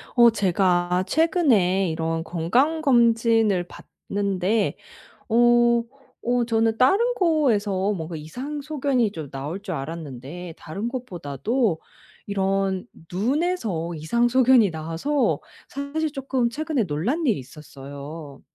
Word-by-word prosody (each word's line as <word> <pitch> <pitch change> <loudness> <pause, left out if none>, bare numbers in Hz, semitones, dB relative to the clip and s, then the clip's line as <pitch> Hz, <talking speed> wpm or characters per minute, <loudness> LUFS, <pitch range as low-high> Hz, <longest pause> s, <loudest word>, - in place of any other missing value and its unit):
어 240 -1 +7
제가 180 -3 +1
최근에 235 - +2
이런 165 0 -2
건강검진을 230 - +2
받는데 200 +1 -2 0.5
어 240 0 +4 0.4
어 245 0 +1
저는 225 -1 +1
다른 410 - +3
곳에서 210 - +1
뭔가 165 -3 -5
이상 255 - -6
소견이 275 -6 0
좀 155 -6 -7
나올 145 +8 -5
줄 195 -2 -5
알았는데 155 +3 -7
다른 200 +9 -5
곳보다도 210 - -2 0.5
이런 195 -1 0 0.3
눈에서 220 - -1
이상 235 +11 +1
소견이 250 -3 +5
나와서 165 - -1 0.3
사실 290 +3 -3
쪼끔 270 -4 -1
최근에 300 0 -1
놀란 200 - -1
일이 225 - +2
있었어요. 140 +1 -10
205 Hz, 240 characters per minute, -24 LUFS, 170-255 Hz, 0.5 s, 어